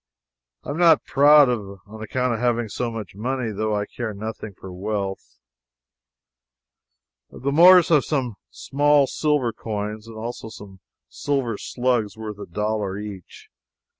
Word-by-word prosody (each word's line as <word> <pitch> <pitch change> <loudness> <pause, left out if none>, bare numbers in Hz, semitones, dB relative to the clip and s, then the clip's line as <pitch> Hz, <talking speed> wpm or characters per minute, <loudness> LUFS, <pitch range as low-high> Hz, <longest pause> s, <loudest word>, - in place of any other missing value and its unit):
I - - -5
am 150 - -4
not 165 -4 +5
proud 145 +1 +6
on 105 -2 -5
account 125 +3 -1
of 115 - -3
having 120 -2 0
so 120 +3 -3
much 110 -5 -7
money, 120 +3 -3
though. 110 +1 -1
I 105 0 -1
care 110 -2 -6
nothing 110 -1 -7
for 95 -1 -9
wealth. 100 0 -4 1.9
The 140 +3 -4
Moors 175 +3 +7
have 150 -4 +4
some 130 -6 -2 0.2
small 145 0 +2
silver 145 -5 0
coins 105 0 -5
and 115 -1 -10
also 115 0 -6
some 100 -3 -12 0.3
silver 135 -6 -2
slugs 120 -5 -1
worth 105 -2 -7
a - - -8
dollar 105 +1 -2
each. 100 -4 -9
110 Hz, 140 wpm, -23 LUFS, 105-135 Hz, 1.9 s, Moors